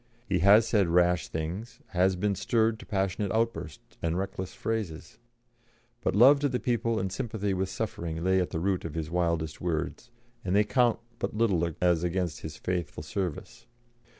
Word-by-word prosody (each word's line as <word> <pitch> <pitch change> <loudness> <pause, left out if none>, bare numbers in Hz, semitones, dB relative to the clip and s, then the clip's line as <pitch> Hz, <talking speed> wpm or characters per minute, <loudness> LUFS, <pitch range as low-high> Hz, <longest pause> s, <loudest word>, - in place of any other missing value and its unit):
He 95 -3 +1
has 105 +5 +6
said 105 -5 +3
rash 90 -1 +3
things, 90 +9 -5
has 95 +1 +2
been 100 +3 0
stirred 110 +3 +1
to - - -12
passionate 100 0 -1
outbursts 115 -9 -3
and 85 +1 0
reckless 95 -1 -4
phrases, 110 -8 -4 0.8
but 115 - 0
love 135 +7 +7
to 145 0 +1
the 125 -1 -1
people 115 -2 0
and 95 0 -2
sympathy 105 -3 -2
with 95 0 -1
suffering 85 -7 -4
lay 95 0 +3
at 90 - -2
the 80 - -3
root 95 +1 0
of 80 -2 -6
his 80 -1 -3
wildest 85 -3 -1
words, 85 +7 -3 0.3
and 95 +1 0
they 105 - +5
count 120 +3 +2 0.2
but - - -3
little 95 -7 +2
as 90 -2 +2
against 90 -2 -1
his 80 -1 -7
faithful 90 -4 -3
service. 100 +7 -5
95 Hz, 175 wpm, -28 LUFS, 85-110 Hz, 0.8 s, love